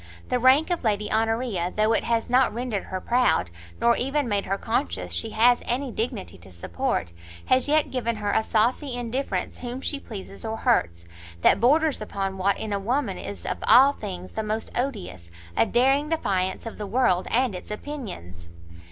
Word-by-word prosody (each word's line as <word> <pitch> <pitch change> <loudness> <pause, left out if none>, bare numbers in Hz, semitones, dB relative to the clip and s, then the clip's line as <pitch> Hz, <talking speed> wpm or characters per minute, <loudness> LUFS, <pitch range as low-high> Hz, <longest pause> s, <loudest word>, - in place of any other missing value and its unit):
The 250 - +1
rank 265 +7 +5
of 350 - -1
Lady 210 -2 0
Honoria, 225 -5 0
though 215 +1 +3
it - - +1
has 230 -1 0
not 250 -1 +3
rendered 235 -3 -3
her 185 - -4
proud, 240 - +1 0.3
nor 235 0 +4
even 275 +1 0
made 205 -3 0
her 195 +1 0
conscious 90 - -2
she 85 - -1
has 240 +2 +4
any 255 +2 -2
dignity 220 - -4
to 90 +2 -13
support, 85 0 -3 0.3
has 255 +2 +3
yet 305 0 +3
given 235 -3 -1
her 205 -1 -2
a - - +3
saucy 240 +5 0
indifference 245 +3 -3
whom 245 +1 -5
she 285 +1 -3
pleases 200 -5 -9
or 225 0 -3
hurts, 85 - +1 0.4
that - - +5
borders 295 +5 +3
upon 195 -2 -4
what 200 +2 +2
in 215 -2 -3
a 200 - 0
woman 225 -2 -1
is 100 -4 -7
of - - -3
all 270 +3 +7
things 185 -7 -7
the 220 - -2
most 215 +1 -3
odious, 195 - -4 0.3
a - - +3
daring 270 +5 +2
defiance 190 - -1
of 225 - -7
the 210 - -4
world 195 -5 +2
and 250 -2 +1
its 180 - -8
opinions." 190 - -7
225 Hz, 185 wpm, -25 LUFS, 190-255 Hz, 0.4 s, all